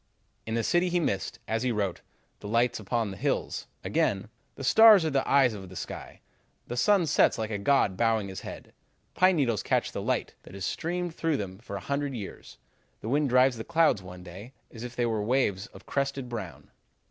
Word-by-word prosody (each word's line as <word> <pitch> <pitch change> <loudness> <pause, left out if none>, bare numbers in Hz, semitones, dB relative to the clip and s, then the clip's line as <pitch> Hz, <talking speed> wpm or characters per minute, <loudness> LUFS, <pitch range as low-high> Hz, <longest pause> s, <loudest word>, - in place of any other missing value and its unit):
"In 110 - -2
the 115 - 0
city 175 +6 +2
he 175 0 +1
missed, 100 - -2
as 110 +1 -1
he 125 0 0
wrote, 100 -5 -2 0.4
'the - - -8
light 115 +2 +1
upon 110 0 -1
the 95 - -8
hills.' - - -2 0.2
Again, - - 0 0.3
'The - - -8
stars 220 -6 +7
are 160 - 0
the 135 -1 0
eyes 135 -4 +5
of 95 -3 -8
the 95 - -12
sky. - - -7 0.4
The 120 - -5
sun 195 +7 +3
sets - - +3
like 110 -1 -3
a 105 - -2
god 100 -4 +2
bowing 115 -3 +1
his 95 -1 -7
head. - - -9 0.4
Pine 185 0 +4
needles 120 - +1
catch - - 0
the - - -4
light - - -1
that - - -13
has 95 -1 -4
streamed 175 - -2
through 160 -3 0
them 95 -2 -6
for 115 -3 -8
a - - -3
hundred 140 +4 -2
years. 100 - -8 0.4
The 110 - -5
wind 145 +1 +2
drives 125 0 +4
the 110 - -5
clouds 165 - +2
one 90 -1 -10
day 95 +8 -10 0.2
as 115 - -10
if 120 0 -7
they 120 - +1
were 110 -2 0
waves 105 -3 0
of - - -15
crested 140 -2 -2
brown.' 110 -8 -7
120 Hz, 210 wpm, -28 LUFS, 100-140 Hz, 0.4 s, stars